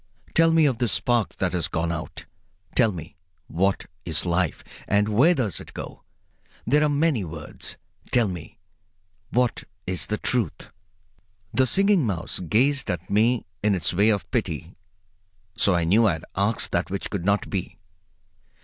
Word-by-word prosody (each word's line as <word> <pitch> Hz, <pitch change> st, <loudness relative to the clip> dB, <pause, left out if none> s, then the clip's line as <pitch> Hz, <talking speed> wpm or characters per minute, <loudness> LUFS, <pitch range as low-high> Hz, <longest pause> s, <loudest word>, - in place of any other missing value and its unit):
Tell 165 Hz, 0 st, +5 dB
me 165 Hz, -1 st, +5 dB
of 130 Hz, -5 st, +1 dB
this 120 Hz, -3 st, +1 dB
spark 120 Hz, -3 st, +1 dB
that 95 Hz, -2 st, -1 dB
has 85 Hz, -3 st, 0 dB
gone 85 Hz, +1 st, -1 dB
out. 80 Hz, -2 st, -6 dB, 0.5 s
Tell 115 Hz, -4 st, +4 dB
me, 80 Hz, -3 st, -9 dB, 0.3 s
what 95 Hz, +4 st, 0 dB, 0.2 s
is 85 Hz, +1 st, 0 dB
life, 85 Hz, -1 st, 0 dB, 0.2 s
and 105 Hz, +1 st, +2 dB
where 135 Hz, +12 st, +5 dB
does 120 Hz, -, -1 dB
it -, -, -12 dB
go? -, -, -7 dB, 0.6 s
There 150 Hz, +5 st, +3 dB
are 150 Hz, -, +3 dB
many 145 Hz, -6 st, +2 dB
words. 80 Hz, -3 st, -6 dB, 0.3 s
Tell 120 Hz, -3 st, +3 dB
me, 90 Hz, -4 st, -7 dB, 0.7 s
what 125 Hz, -1 st, +1 dB, 0.2 s
is 90 Hz, -5 st, -2 dB
the 105 Hz, -, -1 dB
Truth?" 105 Hz, -11 st, -1 dB, 0.8 s
The 130 Hz, 0 st, +3 dB
Singing 195 Hz, +1 st, +3 dB
Mouse 95 Hz, -8 st, -2 dB
gazed 125 Hz, -, +1 dB
at 90 Hz, -1 st, -3 dB
me 115 Hz, +4 st, +3 dB, 0.2 s
in 105 Hz, -1 st, +2 dB
its 80 Hz, -2 st, 0 dB
way 100 Hz, +5 st, +4 dB
of 100 Hz, -3 st, +1 dB
pity, -, -, -2 dB, 0.8 s
so 100 Hz, -, +3 dB
I 85 Hz, -, +1 dB
knew 105 Hz, +7 st, +4 dB
I 95 Hz, -, +3 dB
had 80 Hz, -, -7 dB
asked 100 Hz, +3 st, +1 dB
that 85 Hz, +1 st, 0 dB
which 100 Hz, +1 st, -4 dB
could 100 Hz, -4 st, -3 dB
not 100 Hz, +2 st, +1 dB
be. 95 Hz, -3 st, -3 dB
100 Hz, 165 wpm, -25 LUFS, 90-125 Hz, 0.8 s, Tell